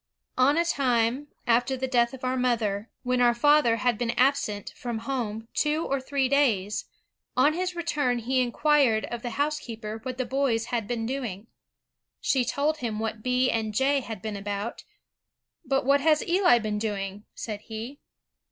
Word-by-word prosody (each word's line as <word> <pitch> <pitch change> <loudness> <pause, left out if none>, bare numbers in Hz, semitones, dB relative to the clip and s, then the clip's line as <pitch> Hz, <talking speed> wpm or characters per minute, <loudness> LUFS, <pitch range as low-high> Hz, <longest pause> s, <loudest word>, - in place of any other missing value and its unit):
On 280 +4 +5
a 340 - +3
time, 255 -3 +1 0.2
after 245 +3 +2
the 260 +1 -2
death 240 -2 +2
of 260 - -15
our 255 0 0
mother, 230 -4 0
when 250 0 +1
our 240 -1 +4
father 290 -2 +4
had 240 -1 0
been 240 -1 -1
absent 250 -6 +1
from 240 -2 -4
home 225 -4 -3
two 305 +2 +1
or 275 -1 -1
three 270 0 0
days, 230 -8 +1 0.5
on 300 - +5
his 365 +1 -2
return 295 -7 0
he 255 +3 +1
inquired 250 -2 +3
of 240 -1 -4
the 245 - -4
housekeeper 235 -7 -3
what 255 +1 -5
the 255 - -1
boys 250 -3 0
had 230 -4 -1
been 230 -1 -2
doing. 230 -6 -4 0.7
She 260 -2 +2
told 290 +5 0
him 230 -6 -3
what 220 0 -3
B. 250 +2 +2
and 220 -2 -2
J. 275 +3 +3
had 225 -7 -7
been 215 -1 -3
about. 205 +2 -4 0.8
'But 270 -3 0
what 280 +1 +4
has 305 0 +3
Eli 360 -7 +5
been 215 -2 -2
doing?' 205 -1 -4
said 210 -2 -5
he. 230 +5 -7
245 Hz, 170 wpm, -27 LUFS, 225-275 Hz, 0.8 s, On